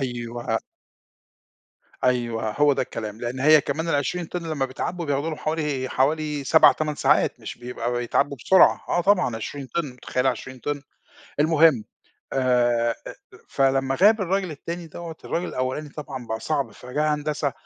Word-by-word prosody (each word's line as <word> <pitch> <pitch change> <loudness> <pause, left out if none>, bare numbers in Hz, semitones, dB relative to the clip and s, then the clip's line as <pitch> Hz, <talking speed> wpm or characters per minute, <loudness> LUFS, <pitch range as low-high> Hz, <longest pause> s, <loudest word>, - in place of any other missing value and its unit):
أيوه. 120 -2 -3 1.5
أيوه، 120 -3 0
هو 145 +6 +3
ده - - 0
الكلام؛ 125 - -10 0.2
لأن 125 +2 -4
هي 155 +2 +7
كمان 155 +4 -3
ال20 165 +4 0
طن 175 +1 -5
لمّا 140 -4 0
بيتْعَبّوا 170 +6 -4
بياخدوا 145 +2 -1
لهم 155 - -4
حوالي 150 -4 -2
حوالي 150 +2 0
7 160 +4 +7
8 155 -1 -2
ساعات - - +2
مش - - -8
بيبقى 120 0 -4
بيتْعَبّوا 120 +3 0
بسرعة، 185 +10 +4
آه 175 - +2
طبعًا 180 - +2
20 135 +5 -6
طن 150 -1 -3
مُتَخيلة 125 +1 -1
20 130 +1 -4
طن، 145 +2 -3 0.6
المهم، 155 -5 +4 0.5
آآ 120 -3 +2 0.2
أ - - -5
أ - - -10 0.3
فلمّا 135 0 +1
غاب 215 +1 +6
الراجل 190 0 0
التاني 170 +3 -6
دوّة، 165 0 -8
الراجل 175 - -2
الأولاني 130 +4 -3
طبعًا 140 -4 -7
بقى 110 0 -3
صعب، 140 -7 -1
فيا 145 +8 -1
هندسة 150 -1 -2
140 Hz, 155 wpm, -24 LUFS, 125-155 Hz, 1.5 s, هي